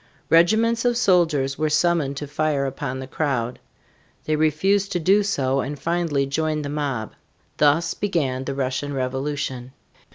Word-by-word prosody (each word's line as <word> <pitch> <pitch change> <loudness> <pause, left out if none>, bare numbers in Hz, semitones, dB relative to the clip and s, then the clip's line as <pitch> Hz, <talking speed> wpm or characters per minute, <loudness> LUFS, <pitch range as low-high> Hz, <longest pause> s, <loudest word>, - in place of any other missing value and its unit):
Regiments 220 +8 +4
of 240 -1 +2
soldiers 160 - +2
were 155 0 +1
summoned 150 -3 +1
to 145 - -4
fire 145 -1 -1
upon 135 -1 -4
the 130 - -5
crowd. 130 -4 -2 0.7
They 155 - +1
refused 190 +7 +1
to 175 - 0
do 195 +5 +4
so 135 -10 0
and 145 +2 -3
finally 165 -4 0
joined 155 +2 -1
the - - -4
mob. 140 -7 -3 0.5
Thus 150 +3 +3
began 135 -10 -1
the 140 - -3
Russian 135 +1 -2
Revolution. 130 -1 -3
150 Hz, 150 wpm, -23 LUFS, 135-170 Hz, 0.7 s, Regiments